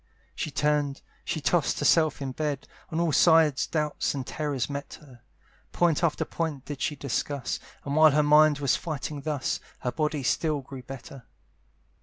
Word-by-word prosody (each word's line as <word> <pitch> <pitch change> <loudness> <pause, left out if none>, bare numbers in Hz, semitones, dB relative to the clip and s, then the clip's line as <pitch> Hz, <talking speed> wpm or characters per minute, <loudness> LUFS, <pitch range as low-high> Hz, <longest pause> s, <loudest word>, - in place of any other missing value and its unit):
She - - -3
turned, 145 -1 0 0.2
she - - -2
toss'd 160 0 +1
herself 150 -1 +3
in 135 - -3
bed, 145 0 -3 0.2
On 165 -2 -2
all 170 -2 +2
sides 160 -3 +4
doubts 150 -2 -1
and 135 -2 -4
terrors 145 -4 -2
met 140 0 -6
her; 130 -6 -17 0.5
Point 175 -1 +2
after 165 -3 +1
point 155 -5 -3
did 145 -2 -6
she 150 - -1
discuss; 140 -1 -2 0.3
And 140 0 -2
while 155 0 +8
her 150 +1 +3
mind 150 0 +6
was 140 -4 +2
fighting 150 -2 -4
thus, 145 -3 -2 0.2
Her 125 - -1
body 150 +1 -1
still 150 +3 0
grew 135 0 -9
better. 135 0 -10
145 Hz, 165 wpm, -27 LUFS, 140-155 Hz, 0.5 s, while